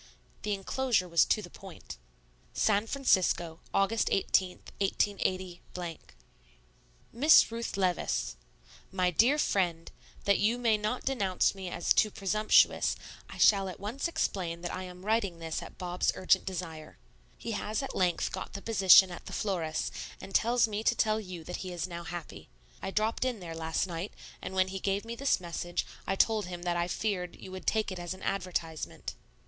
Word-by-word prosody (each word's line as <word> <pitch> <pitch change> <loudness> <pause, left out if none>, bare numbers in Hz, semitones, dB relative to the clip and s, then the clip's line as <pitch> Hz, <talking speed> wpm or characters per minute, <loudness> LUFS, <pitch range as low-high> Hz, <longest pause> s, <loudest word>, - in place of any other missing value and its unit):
The 210 -1 -1
enclosure 205 0 0
was 170 -1 +4
to 215 - +1
the 175 - -10
point. 190 - -10 0.6
SAN 215 0 +2
FRANCISCO, 185 -10 +1
Aug. 205 +3 +2
18, 185 -1 +2 0.2
188. 185 -3 -2 1.1
MISS 280 +1 +6
RUTH 230 -3 -4
LEVICE: 175 - 0 0.6
MY 185 -1 +1
DEAR 240 - +4
FRIEND, 175 - 0 0.3
That 200 -1 +3
you 225 +4 +2
may 230 -3 +2
not 215 +4 -2
denounce 200 -9 +1
me 190 -2 -6
as 175 - +1
too 215 - +4
presumptuous, 210 +2 +3 0.3
I - - -9
shall 195 -2 +5
at 180 - -9
once 225 - -2
explain 175 - -2
that 175 - -4
I 185 0 -4
am 180 +1 -11
writing 210 -5 +1
this 165 -1 -4
at - - -11
Bob's 180 -1 0
urgent 185 - +3
desire. 165 -4 -6 0.4
He - - -5
has 215 +5 -2
at 270 - -5
length 180 -2 +1
got - - -6
the 200 - -6
position 190 -4 +7
at 175 - -9
the - - -7
florist's, 170 -6 -1 0.3
and 195 - -10
tells 235 0 +3
me 215 0 -3
to 235 - +3
tell 215 -1 +2
you 185 -5 -8
that 180 +2 -5
he 185 - -6
is 175 0 -3
now 170 -1 -7
happy. 175 -2 -8 0.3
I - - -3
dropped 215 +4 0
in 250 -4 -1
there 170 -3 -7
last 160 +1 -1
night; 175 +2 -5 0.3
and 190 - -6
when 190 0 +3
he 190 0 -4
gave 195 +2 -1
me 230 - -5
this 275 +4 +1
message, 175 0 -3 0.2
I 195 - +1
told 215 0 +2
him 175 -1 -7
that 175 -1 0
I 175 0 0
feared 180 -2 -2
you 190 - -10
would 185 0 -8
take 220 -2 +1
it 185 - -5
as 175 +1 -4
an 185 - -13
advertisement. 175 -4 -3
190 Hz, 175 wpm, -30 LUFS, 175-215 Hz, 1.1 s, position